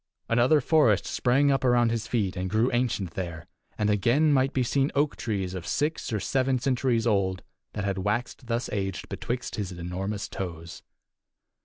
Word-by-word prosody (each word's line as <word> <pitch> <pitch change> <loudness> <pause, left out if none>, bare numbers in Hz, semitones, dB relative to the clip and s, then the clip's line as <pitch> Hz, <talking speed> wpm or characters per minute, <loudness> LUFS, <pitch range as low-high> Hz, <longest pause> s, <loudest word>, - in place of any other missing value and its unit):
Another 125 +6 +4
forest 125 - +3
sprang 135 +3 +2
up 135 - +1
around 120 -2 +3
his 115 -1 -2
feet 100 -6 -1
and 95 0 -3
grew 110 +5 +2
ancient 120 -7 0
there, 85 -5 -5 0.3
and 105 - +1
again 120 +9 +3
might 135 0 +3
be 130 - +1
seen 135 +3 +1
oak 145 +1 +2
trees 95 -5 -3
of 90 -2 -6
six 150 -1 -1
or 110 - 0
seven 130 +5 +1
centuries 125 -3 +1
old, 95 -4 +1 0.3
that 100 - -3
had 100 -1 -1
waxed 115 +5 -2
thus 120 +1 -1
aged 95 -2 -3
betwixt 120 +1 -4
his 100 -3 -3
enormous 90 +4 -4
toes. 85 -3 -6
115 Hz, 170 wpm, -27 LUFS, 95-130 Hz, 0.3 s, Another